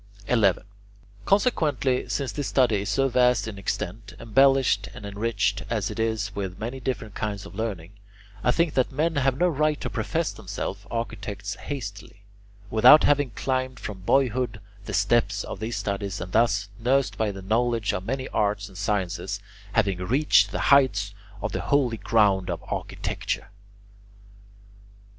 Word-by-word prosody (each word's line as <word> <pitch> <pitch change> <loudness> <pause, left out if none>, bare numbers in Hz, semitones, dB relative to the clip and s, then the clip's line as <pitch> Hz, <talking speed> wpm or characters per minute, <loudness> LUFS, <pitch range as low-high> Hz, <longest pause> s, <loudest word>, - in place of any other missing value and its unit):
11. 105 -7 +3 0.6
Consequently, 155 - +1
since 140 -3 -1
this 145 -2 -3
study 125 -5 +3
is 100 - -4
so 135 +4 +2
vast 125 -2 +3
in 100 -3 -6
extent, 100 +1 -4
embellished 130 -2 +3
and 105 - -9
enriched 100 0 -1
as 105 -4 -1
it - - -7
is 110 -2 -1
with 95 -3 -4
many 120 +4 -5
different 115 -5 -4
kinds 105 -1 -4
of - - -11
learning, 100 -5 -4 0.5
I - - +2
think 165 +5 +2
that 130 - +1
men 155 +3 0
have 135 -1 +2
no 180 - +3
right 155 -2 +1
to - - -4
profess 165 -1 -1
themselves 100 0 -6
architects 105 -3 -4
hastily, 100 -7 -7 0.5
without 125 +7 +8
having 145 -2 +3
climbed 130 +1 -2
from 100 -3 -6
boyhood 125 +2 +1 0.3
the 105 - -6
steps 110 +4 +2
of - - -7
these 110 +2 -3
studies 100 -1 -3
and 90 - -6
thus, 100 -3 +2
nursed 130 +3 +1
by 110 -1 0
the 95 -1 -9
knowledge 115 +1 +1
of 90 - -3
many 130 +5 -3
arts 105 -1 0
and 95 -2 -11
sciences, 100 0 -2 0.3
having 100 -5 +1
reached 130 +12 +3
the - - -3
heights 105 -8 +3 0.3
of 105 - -1
the - - -2
holy 130 -5 +1
ground 100 -3 +2
of - - -4
architecture. - - -4
110 Hz, 155 wpm, -25 LUFS, 100-130 Hz, 0.6 s, without